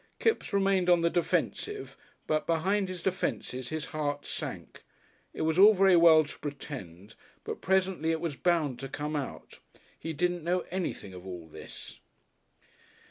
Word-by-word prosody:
Kipps 450 Hz, -, +1 dB
remained 195 Hz, -2 st, +2 dB
on 175 Hz, -1 st, +5 dB
the 170 Hz, 0 st, +2 dB
defensive, 410 Hz, -, -1 dB, 0.3 s
but 155 Hz, 0 st, 0 dB
behind 190 Hz, +4 st, +1 dB
his 180 Hz, -2 st, -6 dB
defences 130 Hz, -9 st, -2 dB
his 155 Hz, -1 st, -3 dB
heart 145 Hz, -2 st, -2 dB
sank. -, -, -6 dB, 0.5 s
It -, -, -4 dB
was 160 Hz, +2 st, +1 dB
all 210 Hz, +2 st, +9 dB
very 190 Hz, -1 st, +5 dB
well 165 Hz, -2 st, +7 dB
to 145 Hz, -, -10 dB
pretend, 110 Hz, -, -7 dB, 0.3 s
but -, -, -5 dB
presently 185 Hz, -3 st, +1 dB
it 165 Hz, 0 st, +1 dB
was 160 Hz, -4 st, -3 dB
bound 155 Hz, -4 st, +1 dB
to 135 Hz, -, -6 dB
come 150 Hz, +3 st, -3 dB
out. 140 Hz, -3 st, -6 dB, 0.4 s
He 165 Hz, -, -4 dB
didn't 175 Hz, +1 st, 0 dB
know 180 Hz, +2 st, +1 dB
anything 175 Hz, -, -3 dB
of 90 Hz, +1 st, -10 dB
all 90 Hz, -3 st, -7 dB
this.... 80 Hz, -, -11 dB
165 Hz, 155 wpm, -29 LUFS, 145-185 Hz, 0.5 s, all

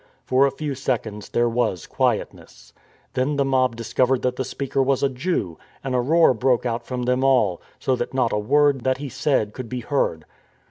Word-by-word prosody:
For 130 Hz, +2 st, +4 dB
a -, -, -2 dB
few 150 Hz, -1 st, -4 dB
seconds 115 Hz, -6 st, -3 dB
there 120 Hz, 0 st, +2 dB
was 115 Hz, -7 st, -1 dB
quietness. -, -, -3 dB, 0.4 s
Then 135 Hz, +3 st, 0 dB
the 140 Hz, -1 st, +1 dB
mob 130 Hz, -3 st, +2 dB
discovered 125 Hz, +3 st, 0 dB
that 125 Hz, 0 st, 0 dB
the 130 Hz, -, -2 dB
speaker 135 Hz, +1 st, -2 dB
was 135 Hz, 0 st, +1 dB
a 140 Hz, -, +3 dB
Jew, 130 Hz, -, -2 dB, 0.2 s
and 135 Hz, -1 st, -3 dB
a 125 Hz, -, +2 dB
roar 160 Hz, +3 st, +4 dB
broke 125 Hz, +1 st, +1 dB, 0.2 s
from 125 Hz, +1 st, -4 dB
them 125 Hz, +1 st, +1 dB
all, 130 Hz, -10 st, +2 dB, 0.2 s
so 130 Hz, -, 0 dB
that 120 Hz, -1 st, -4 dB
not 130 Hz, -3 st, 0 dB
a 105 Hz, -, +1 dB
word 140 Hz, +4 st, +3 dB
that 130 Hz, +1 st, +1 dB
he 140 Hz, 0 st, -6 dB
said 135 Hz, -5 st, 0 dB
could 125 Hz, -3 st, -7 dB
be 125 Hz, -1 st, -4 dB
heard. 110 Hz, -, -1 dB
130 Hz, 195 wpm, -23 LUFS, 120-135 Hz, 0.4 s, For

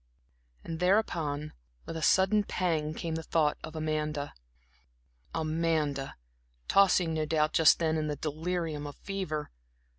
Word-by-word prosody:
And 165 Hz, -1 st, -5 dB
thereupon 165 Hz, -6 st, +1 dB, 0.3 s
with -, -, -6 dB
a 160 Hz, -, -4 dB
sudden 190 Hz, +5 st, +4 dB
pang, 160 Hz, -6 st, -1 dB
came 165 Hz, -1 st, -3 dB
the 160 Hz, -, -2 dB
thought 155 Hz, -2 st, +1 dB
of 160 Hz, 0 st, -8 dB
Amanda 155 Hz, -2 st, -2 dB, 1.0 s
Amanda, 155 Hz, -3 st, -1 dB, 0.5 s
tossing 185 Hz, -4 st, +4 dB
no 155 Hz, -1 st, -1 dB
doubt 155 Hz, 0 st, +1 dB
just 160 Hz, -, +6 dB
then 160 Hz, -1 st, +1 dB
in 155 Hz, -1 st, -1 dB
the 150 Hz, -, -2 dB
delirium 155 Hz, 0 st, -3 dB
of 145 Hz, -, -8 dB
fever. 185 Hz, -6 st, -4 dB
160 Hz, 130 wpm, -30 LUFS, 150-170 Hz, 1.0 s, just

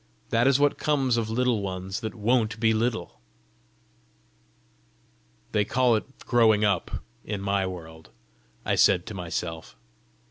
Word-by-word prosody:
"That 115 Hz, +3 st, +3 dB
is 135 Hz, 0 st, +4 dB
what 145 Hz, 0 st, +2 dB
comes 135 Hz, -5 st, +1 dB
of 115 Hz, -2 st, -1 dB
Little 120 Hz, -1 st, +1 dB
Ones 95 Hz, 0 st, -4 dB
that 110 Hz, -3 st, -5 dB
WON'T 110 Hz, -1 st, +1 dB
be 110 Hz, -1 st, +3 dB
little!" 115 Hz, +1 st, -2 dB, 2.3 s
"They 105 Hz, -, +2 dB
call 125 Hz, +2 st, +2 dB
it 135 Hz, +5 st, -6 dB
growing 110 Hz, -3 st, +4 dB
up 100 Hz, -4 st, -1 dB, 0.2 s
in 105 Hz, -1 st, -4 dB
my 100 Hz, -1 st, 0 dB
world!" 80 Hz, -3 st, -9 dB, 0.6 s
I -, -, +1 dB
said 90 Hz, -3 st, +4 dB
to 110 Hz, -, -7 dB
myself. 85 Hz, -3 st, -5 dB
110 Hz, 135 wpm, -26 LUFS, 95-120 Hz, 2.3 s, is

